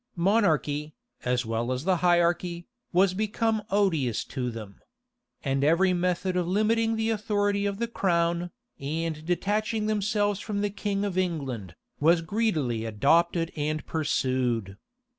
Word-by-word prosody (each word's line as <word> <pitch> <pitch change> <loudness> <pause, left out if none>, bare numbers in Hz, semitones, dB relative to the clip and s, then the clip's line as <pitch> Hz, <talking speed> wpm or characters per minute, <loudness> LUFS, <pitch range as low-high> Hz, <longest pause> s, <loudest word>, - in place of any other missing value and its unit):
Monarchy, 160 -6 +1 0.3
as 125 0 +1
well 115 +2 -1
as 130 +1 -2
the 185 +1 +2
hierarchy, 175 0 +2 0.3
was 185 +1 +4
become 215 +2 0
odious 165 - +1
to 125 -3 -3
them; 110 -4 -8 0.6
and 135 0 0
every 175 +5 +4
method 180 +1 0
of 180 -2 0
limiting 225 +4 +2
the 220 0 0
authority 205 -1 0
of 200 -1 -3
the 235 +2 -1
crown, 175 -5 0 0.3
and 155 +2 -3
detaching 210 +4 0
themselves 205 -1 +1
from 205 -2 -3
the 205 0 0
king 205 0 -2
of 185 -2 -1
England, 135 - -3 0.2
was 165 +3 +4
greedily 155 - 0
adopted 165 - +2
and 155 0 -2
pursued. 130 - -1
175 Hz, 135 wpm, -27 LUFS, 145-205 Hz, 0.6 s, was